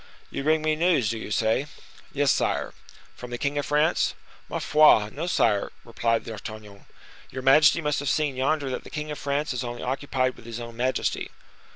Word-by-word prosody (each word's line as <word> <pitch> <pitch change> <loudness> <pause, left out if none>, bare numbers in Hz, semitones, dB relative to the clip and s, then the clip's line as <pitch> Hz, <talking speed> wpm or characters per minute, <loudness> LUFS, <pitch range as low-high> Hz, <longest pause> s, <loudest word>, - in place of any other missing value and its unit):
"You - - -3
bring 155 +1 +2
me 155 0 +2
news, 155 - +2
do 115 - -4
you - - -7
say?" 110 +6 +1 0.4
"Yes, 145 -1 +2
sire." - - 0 0.4
"From 125 - -9
the 120 - -4
king 140 +3 -1
of 145 - -3
France?" 150 +2 +2 0.3
"Ma - - -2
foi! 150 -9 +5
no, 170 - -4
sire," 105 - +1
replied 115 -1 0
D'Artagnan. 110 -2 -9 0.4
"Your 130 0 -6
majesty 150 +5 +6
must 150 -2 0
have 145 -1 -2
seen 150 -3 0
yonder 135 +1 0
that - - -4
the - - -11
king 150 0 -5
of 150 - -6
France 140 +1 -1
is 125 0 -3
only 120 0 -6
occupied 130 -1 -1
with 115 - -15
his 115 0 -6
own 115 -1 -8
majesty." 130 +2 -1
130 Hz, 195 wpm, -25 LUFS, 115-150 Hz, 0.4 s, majesty